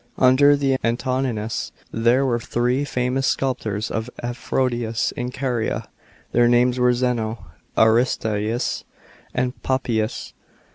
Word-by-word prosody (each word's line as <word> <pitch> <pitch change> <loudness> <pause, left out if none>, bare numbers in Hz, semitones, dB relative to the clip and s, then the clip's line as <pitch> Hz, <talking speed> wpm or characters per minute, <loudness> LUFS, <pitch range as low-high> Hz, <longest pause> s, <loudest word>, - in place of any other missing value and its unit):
Under 135 +3 +6
the 135 -2 +1
Antonines 120 -2 -1 0.2
there 120 +4 +3
were 120 -3 +1
three 125 +4 0
famous 125 0 0
sculptors 110 -5 -1
of 110 +2 -3
Aphmdisias 120 -1 -1
in 125 0 -4
Caria. 125 -3 -2 0.4
Their 120 0 +4
names 125 +1 +3
were 125 0 +4
Zeno, 120 -3 -1 0.3
Aristeas, 110 -1 +1 0.5
and 125 +1 -1
Papias. 120 -4 -1
125 Hz, 105 wpm, -22 LUFS, 115-130 Hz, 0.5 s, Under